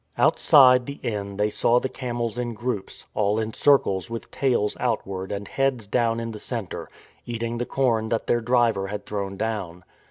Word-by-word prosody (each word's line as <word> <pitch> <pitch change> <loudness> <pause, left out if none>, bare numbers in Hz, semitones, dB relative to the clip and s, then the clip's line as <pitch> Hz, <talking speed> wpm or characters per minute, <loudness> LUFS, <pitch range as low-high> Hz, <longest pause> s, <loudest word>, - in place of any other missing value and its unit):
Outside 125 -3 +6
the 140 0 -6
inn 100 -3 -3
they 105 +1 +1
saw 120 +3 +3
the 130 - -2
camels 120 -3 -3
in 120 -1 -3
groups, 115 -3 -4
all 105 0 +1
in 110 0 -2
circles 105 -10 +3
with 115 0 -6
tails 120 -6 +1
outward 95 -1 -2
and 100 0 -4
heads 135 -5 0
down 115 +2 +1
in 115 0 -4
the 105 - -8
centre, 115 -7 -5 0.4
eating 115 0 -3
the 120 - -2
corn 115 -5 +1
that 115 - -1
their 120 - +1
driver 115 -4 +2
had 105 +1 -5
thrown 100 -2 -4
down. 95 -6 -3
115 Hz, 180 wpm, -24 LUFS, 105-120 Hz, 0.4 s, Outside